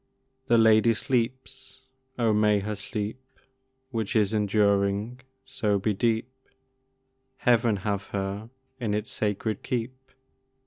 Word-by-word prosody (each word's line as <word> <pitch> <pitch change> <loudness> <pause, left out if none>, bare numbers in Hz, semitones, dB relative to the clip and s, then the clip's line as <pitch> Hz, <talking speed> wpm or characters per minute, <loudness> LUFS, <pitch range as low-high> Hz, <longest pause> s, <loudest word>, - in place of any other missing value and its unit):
The 120 - +4
lady 110 0 +5
sleeps! 130 +2 -3 0.4
Oh, 115 -3 +2
may 105 0 +3
her 105 +2 -3
sleep 105 +4 -5 0.7
Which 110 -3 -2
is 105 -1 +3
enduring, 105 +2 +1 0.3
so 110 -6 0
be 105 +2 0
deep! 115 +3 0 1.1
Heaven 120 -3 +3
have 100 -1 -1
her 100 +2 -4 0.3
in 110 -4 -1
its 105 +1 -3
sacred 105 0 -2
keep! 125 +1 -3
110 Hz, 115 wpm, -26 LUFS, 105-120 Hz, 1.1 s, lady